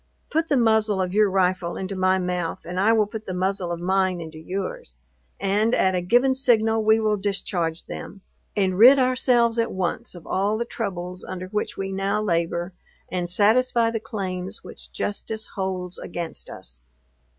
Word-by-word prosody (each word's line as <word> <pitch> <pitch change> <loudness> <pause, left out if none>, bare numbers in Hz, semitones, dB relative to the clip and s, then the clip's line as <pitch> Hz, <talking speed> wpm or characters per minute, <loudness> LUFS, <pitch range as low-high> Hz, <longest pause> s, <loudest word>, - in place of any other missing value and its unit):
Put 320 +1 0
the 285 - +3
muzzle 220 -4 +3
of 185 -1 -1
your 210 0 +4
rifle 185 -2 0
into 190 +1 -4
my 185 0 +3
mouth, 180 -2 -3
and 180 +1 -4
I 210 +4 +4
will 220 -2 +4
put 215 +1 -8
the 185 - -3
muzzle 185 -1 -1
of 170 - -3
mine 185 0 +1
into 160 -1 -8
yours, 200 - -5 0.4
and 210 +4 +2
at 190 - +2
a 180 - 0
given 245 +9 +3
signal 225 -4 +3
we 220 +1 +4
will 215 -1 +1
discharge 185 -4 -2
them, 200 - -8 0.3
and 190 -2 +1
rid 255 +5 +9
ourselves 250 -2 +3
at 230 - +1
once 185 +4 -3
of 175 - -11
all 205 +3 0
the 235 - -2
troubles 180 -6 -5
under 185 0 -6
which 210 +1 -3
we 195 0 -3
now 195 +2 0
labor, 170 -2 -1 0.4
and 180 -1 -2
satisfy 230 +4 +3
the 225 - -2
claims 190 -4 -5
which - - -10
justice 220 +1 -3
holds 185 -2 -3
against 170 -2 -6
us." 65 0 -8
195 Hz, 175 wpm, -24 LUFS, 180-220 Hz, 0.4 s, rid